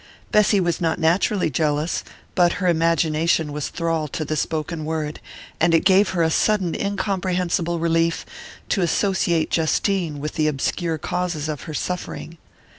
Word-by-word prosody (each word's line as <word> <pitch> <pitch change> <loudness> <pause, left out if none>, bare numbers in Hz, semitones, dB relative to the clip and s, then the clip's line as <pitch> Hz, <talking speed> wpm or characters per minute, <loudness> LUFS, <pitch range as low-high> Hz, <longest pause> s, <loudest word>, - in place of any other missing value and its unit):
Bessy 210 -1 +4
was 175 -2 0
not 165 -1 +1
naturally 175 +2 +2
jealous, 150 +3 0 0.3
but 175 -1 +3
her 185 - -1
imagination 165 -2 +2
was 150 -1 -3
thrall 165 -2 -1
to 155 +2 -4
the 155 - -2
spoken 155 +1 -2
word, 155 -1 -3 0.4
and 165 +1 +4
it 165 - +2
gave 195 +2 +5
her 170 - +3
a 160 - +2
sudden 195 -2 +2
incomprehensible 185 -4 -1
relief 165 0 +1 0.4
to 195 - +1
associate 175 -2 +1
Justine 165 -1 0
with 150 +1 -4
the 155 -1 +1
obscure 160 +3 -1
causes 170 -1 -2
of 150 -3 -5
her 155 - -5
suffering. 170 -2 -5
165 Hz, 150 wpm, -22 LUFS, 155-180 Hz, 0.4 s, gave